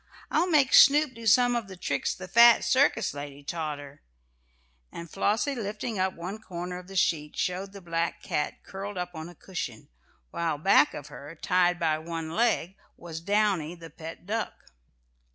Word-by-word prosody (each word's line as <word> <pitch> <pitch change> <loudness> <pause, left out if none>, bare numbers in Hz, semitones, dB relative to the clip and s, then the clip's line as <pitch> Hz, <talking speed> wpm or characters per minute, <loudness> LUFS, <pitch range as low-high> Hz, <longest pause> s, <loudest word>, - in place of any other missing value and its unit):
I'll 340 +4 +2
make 285 -5 +3
Snoop 290 0 +7
do 230 -1 -7
some 245 +2 +5
of 235 -4 -2
the 190 -1 -10
tricks - - -1
the 185 - -9
fat 235 +4 +7
circus 240 -1 +2
lady 145 0 -8
taught 155 -1 -3
her," 145 -1 -12 0.9
and 170 - -8
Flossie 210 - 0
lifting 215 -2 -4
up 185 0 0
one 185 +6 -6
corner 180 -2 -6
of 180 - -13
the 195 - -10
sheet, 150 -4 0
showed 185 +2 -2
the 200 0 -11
black 170 0 -2
cat 150 - -3
curled 195 +1 -7
up 180 0 -4
on 160 0 -7
a 175 - -14
cushion, 150 - -6 0.4
while 165 -3 -1
back 150 -2 +4
of 145 0 -8
her, 145 +4 -10
tied 180 -1 +2
by 160 -2 +1
one 165 0 -5
leg, 210 -3 0 0.2
was 165 -2 -8
Downy 195 -4 +1
the 165 -1 -12
pet 165 +2 -9
duck. 215 - -4
180 Hz, 175 wpm, -27 LUFS, 165-215 Hz, 0.9 s, Snoop